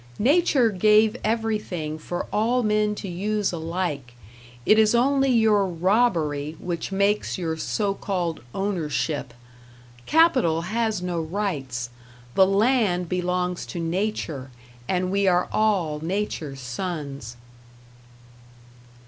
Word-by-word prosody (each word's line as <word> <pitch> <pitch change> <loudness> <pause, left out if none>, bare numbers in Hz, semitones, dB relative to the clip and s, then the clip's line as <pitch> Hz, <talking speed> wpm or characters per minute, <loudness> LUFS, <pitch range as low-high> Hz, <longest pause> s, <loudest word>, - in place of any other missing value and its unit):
Nature 270 -2 +3
gave 215 +3 +4
everything 210 -8 -2
for 175 +3 -4
all 240 +4 +2
men 210 -1 +1
to 200 - -6
use 205 +3 -1
alike; 160 -7 -3 0.5
it 215 - +5
is 220 +1 +4
only 270 +2 +3
your 220 -5 +4
robbery 165 -5 +1
which 175 +1 -4
makes 200 +2 +1
your 165 -3 -2
so 200 +5 -1
called 180 -5 -3
"ownership". 160 -8 -2 0.8
Capital 260 - +4
has 220 0 -1
no 175 -2 -2
rights. 150 - -3 0.4
The 190 -1 +5
land 195 -4 +2
belongs 180 0 -1
to 175 - -5
Nature, 165 -6 -2 0.4
and 185 0 0
we 200 0 +2
are 180 -1 +3
all 185 -9 +1
Nature's 160 -5 -3
sons. 135 - -5
185 Hz, 110 wpm, -24 LUFS, 165-215 Hz, 0.8 s, it